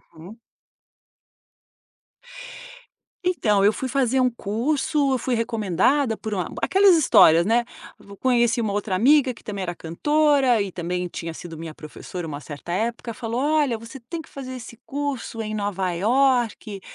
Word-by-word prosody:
Uhum. 180 +8 -12 2.9
Então, 215 - +2
eu 210 - +5
fui 260 - -4
fazer 265 -1 +1
um 255 - +3
curso, 270 +6 0
eu - - +2
fui 250 +1 -2
recomendada 225 - +1
por 220 -1 -5
uma 180 -4 -1 0.2
aquelas 385 -2 +5
histórias, 170 - +6
né. 235 +2 +3 0.4
V 200 - -13
conheci 240 -2 +2
uma 210 -3 -1
outra 205 -2 -1
amiga 260 +4 +4
que - - -18
também 200 -2 -5
era 175 -1 -4
cantora 275 - +2
e 200 -1 -3
também 180 +1 -3
tinha 165 -1 -6
sido 165 -1 -9
minha 160 -1 -7
professora 165 +3 -8
uma 145 -2 -5
certa 145 +3 -8
época, 230 +4 -2
falou: 230 +3 -3
"Olha, 295 -5 +2
você 230 +4 -11
tem 320 +8 -7
que - - -18
fazer 260 -2 -8
esse 235 -1 -10
curso 275 -5 -4
em 215 0 -4
Nova 195 -3 -2
Iorque. 230 -1 +1
230 Hz, 155 wpm, -23 LUFS, 190-265 Hz, 2.9 s, histórias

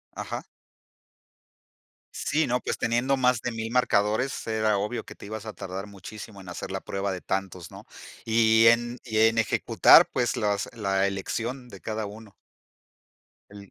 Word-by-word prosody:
Ajá. - - -5 1.7
Sí, 155 +2 0
¿no? 125 +1 +1
Pues, - - -3
teniendo 120 +4 +1
más 125 -2 +2
de 125 - -3
1000, 115 0 -4
marcadores, 120 0 +1
era 110 -2 +1
obvio 105 +4 -3
que - - -11
te - - -12
ibas 110 +1 -7
a 110 - -5
tardar 95 0 -6
muchísimo 100 +1 -10
en 95 - -12
hacer 90 - -6
la - - -3
prueba 100 0 -3
de 90 - -5
tantos, 95 -3 -4
¿no? - - -12 0.4
Y 110 0 +4
en 120 +1 +3
y 110 -3 -2
en 110 +1 +4
ejecutar, 115 - +5
pues, 120 -1 0
las 105 -1 0
la 100 -3 +1
elección 115 +6 -4
de 100 -5 -12
cada 110 -1 -4
uno. 105 0 -11 1.2
El 100 -1 -12
110 Hz, 160 wpm, -26 LUFS, 100-115 Hz, 1.7 s, ejecutar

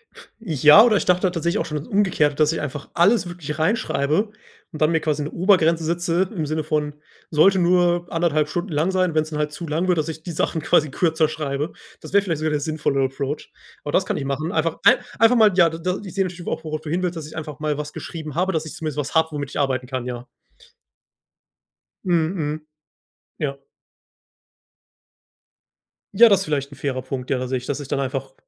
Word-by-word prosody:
F - - -15
ja, 160 - +6
oder 225 -3 +4
ich - - -2
dachte 180 0 +2
halt 185 -2 +2
tatsächlich 170 +4 0
auch - - -1
schon 150 - -4
das 145 - -7
Umgekehrte, 180 -8 +2
dass 155 +1 +3
ich 165 - -3
einfach 145 0 -6
alles 185 +2 +3
wirklich 160 -3 -6
reinschreibe 160 0 +1 0.4
und 155 - -9
dann 155 +1 +4
mir 160 -1 +1
quasi 150 -1 -1
'ne 145 - -5
Obergrenze 170 -3 +3
setze 175 +2 0
im 160 -4 -2
Sinne 155 +1 -2
von: 150 -1 -1 0.4
Sollte 190 +5 +4
nur 175 -1 +2
1,5 155 -3 +1
Stunden 175 +4 -3
lang 155 +5 +1
sein. 185 -2 +1
Wenn's 155 0 0
dann 150 -1 -4
halt 150 0 -1
zu 165 +3 -7
lang 160 +4 -1
wird, 180 -2 +2
dass 155 +1 -1
ich 160 0 -7
die 175 - -6
Sachen 160 0 -1
quasi 155 0 +3
kürzer 160 +2 +1
schreibe. 150 -1 -3 0.3
Das - - -11
wäre 200 - +6
vielleicht 165 -6 -2
sogar 155 0 -1
der 150 - 0
sinnvollere 145 -2 0
Approach. 135 +2 -4 0.3
Aber - - -4
das - - +2
kann - - -2
ich 135 - -4
machen. 140 +5 -2
Einfach 160 -1 0
ei 245 +3 +7 0.2
einfach 225 +2 +5
mal, 220 -3 +6
ja, 175 -3 +5
d 165 - -7
da 180 +2 -1
die 205 - -9
ich 175 - -12
sehe 195 - +2
das 180 - -8
auch, - - -3
worauf 155 -1 -4
du 155 - -8
hin 175 +4 -1
willst, 180 -1 -2
dass 155 -2 -6
ich 155 - -11
einfach 150 -3 -6
mal 150 -1 -1
was 150 0 -5
geschrieben 155 -4 -7
habe, 185 +3 +1
dass 160 0 -1
ich 155 - -7
zumindest 155 -3 -5
was 145 +1 -3
habe, 160 0 +3
womit 145 -2 -4
ich - - -5
arbeiten 130 -3 0
kann, 130 -1 -4
ja. 125 -1 -6 1.8
Mhm, 170 0 +1
mhm, 155 -1 -4 0.7
ja. 140 -2 -4 2.5
Ja, 230 +4 +8
das 200 -3 +3
vielleicht 145 -5 -2
'n - - -10
fairer 130 -2 -3
Punkt, 130 -1 -5
ja, 135 - +1
tatsächlich. 125 0 -3
Dass 145 0 -2
ich 145 - -7
dann 135 - -1
einfach 135 0 -3
155 Hz, 225 wpm, -22 LUFS, 145-175 Hz, 2.5 s, Ja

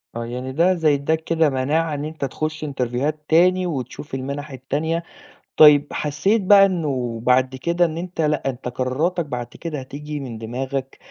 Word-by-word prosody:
آه 115 0 -3
يعني 125 +2 -5
ده 170 +7 +3
زي 160 -4 +2
إدّاك 160 +3 -1
كده 165 -2 +2
مناعة 150 +5 0
إن 145 0 -3
أنت 155 -2 -4
تخش 155 +4 -4
إنترفيوهات 140 +2 -2
تاني 180 +3 +4
وتشوف 135 -2 -6
المنح 140 +3 -5
التانية، 150 +6 -2 0.5
طيب 150 -1 +8
حسيت 155 +10 +1
بقى 195 +1 +7
إنه 135 -11 -2
بعد 130 +1 +3
كده 170 +6 +1
إن 160 0 -3
أنت 175 -1 -4
لأ 150 -3 0
أنت 125 0 -6
قراراتك 140 +8 -1
بعد 125 -4 -4
كده 155 +2 -6
هتييجي 145 +3 -7
من 125 -5 -6
دماغك، 130 +4 -4
145 Hz, 170 wpm, -22 LUFS, 130-165 Hz, 0.5 s, طيب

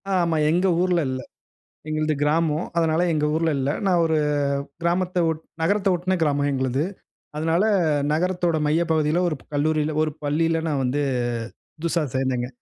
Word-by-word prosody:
ஆமா. 170 -3 +1
எங்க 180 +3 +2
ஊர்ல 180 -1 +2
இல்ல. 130 0 -3 0.7
எங்களது 155 0 0
கிராமம். 155 +2 +1
அதனால 160 0 +2
எங்க 150 -1 +1
ஊர்ல 165 0 +1
இல்ல. 135 +1 0 0.2
நான் 180 -3 +3
ஒரு 160 -1 +1 0.6
கிராமத்த 180 +1 0
ஒட் 160 -1 -4 0.2
நகரத்த 200 +4 +2
ஒட்டன 180 +2 0
கிராமம் 145 -2 +1
எங்களது. 130 +1 0 0.5
அதனால 165 +4 +1 0.5
நகரத்தோட 175 0 0
மைய 155 +3 +2
பகுதியில 155 +2 +2
ஒரு 155 - -2 0.2
கல்லூரில 155 +1 0
ஒரு 155 - -1
பள்ளியில 165 +3 +1
நான் 145 -3 0
வந்து 130 +3 0 0.8
புதுசா 170 0 0
சேர்ந்தேங்க. 130 -2 0
160 Hz, 145 wpm, -23 LUFS, 150-170 Hz, 0.8 s, நான்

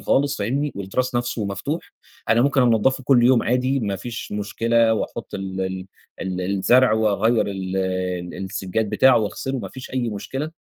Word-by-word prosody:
خالص 140 +8 +1
فاهمني، 135 +8 -1
والتراس 120 +7 -2
نفسه 120 -2 -1
مفتوح، 100 - -4 0.4
أنا 115 +1 +4
ممكن 140 -1 +3
أنضّفه 125 +3 +2
كل 125 -3 +5
يوم 125 -1 +5
عادي، 130 +2 +1
ما 100 -3 -2
فيش 115 +2 -7
مشكلة، 115 +2 +2
وأحط 110 - -5
ال 95 -1 -4
ال 95 0 -3 0.3
ال 95 -1 -3
الزرع، 100 +6 +3
وأغيّر 110 +1 +2
ال 95 -1 -4
ال 95 -2 -2
السجّاد 95 +3 -2
بتاعه، 130 -3 +5
وأغسله، 130 +5 -3
ما - - -5
فيش 130 - -10
أي 125 -2 -1
مشكلة، 135 +8 -4
110 Hz, 165 wpm, -22 LUFS, 95-130 Hz, 0.4 s, كل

